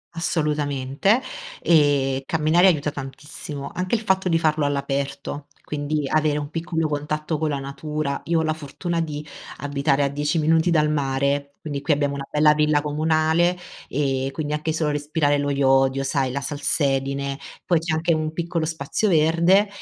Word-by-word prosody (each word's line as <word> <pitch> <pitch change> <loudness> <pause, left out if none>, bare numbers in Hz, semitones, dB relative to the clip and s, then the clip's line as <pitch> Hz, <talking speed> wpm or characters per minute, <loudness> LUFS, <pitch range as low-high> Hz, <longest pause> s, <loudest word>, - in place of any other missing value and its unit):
Assolutamente 150 - 0 0.4
e 140 -4 +3
camminare 160 +3 +4
aiuta 150 -4 +2
tantissimo, 145 +1 -7
anche 185 +4 -1
il 220 - -2
fatto 190 -3 +1
di 165 - +3
farlo 155 -2 +1
all'aperto, 140 0 -2 0.2
quindi 150 0 -2
avere 150 0 +1
un 145 0 -5
piccolo 165 -1 -1
contatto 150 +1 -2
con 155 -1 0
la 145 - -1
natura, 140 +1 -4
io 165 -1 +1
ho - - -1
la 155 0 0
fortuna 165 +3 -3
di 150 -2 -4 0.3
abitare 140 0 +1
a 140 - +1
10 145 +3 -1
minuti 160 +2 +3
dal 150 -3 +3
mare, 140 0 -1
quindi 145 -2 -4
qui 150 - +2
abbiamo 145 -1 0
una 140 -1 -5
bella 150 0 +5
villa 150 -1 +2
comunale 160 +3 +2 0.3
e 135 -1 0
quindi 150 -1 -3
anche 150 +1 -1
solo 155 -1 0
respirare 145 0 0
lo 145 0 -1
iodio, 135 -1 +3
sai, 135 -2 0
la 140 +1 -3
salsedine 140 -1 -1 0.3
poi 170 -3 +3
c'è 160 -1 -1
anche 165 +2 +1
un 155 0 -2
piccolo 170 0 -2
spazio 160 +6 -1
verde 170 +5 +4
150 Hz, 165 wpm, -23 LUFS, 140-160 Hz, 0.4 s, bella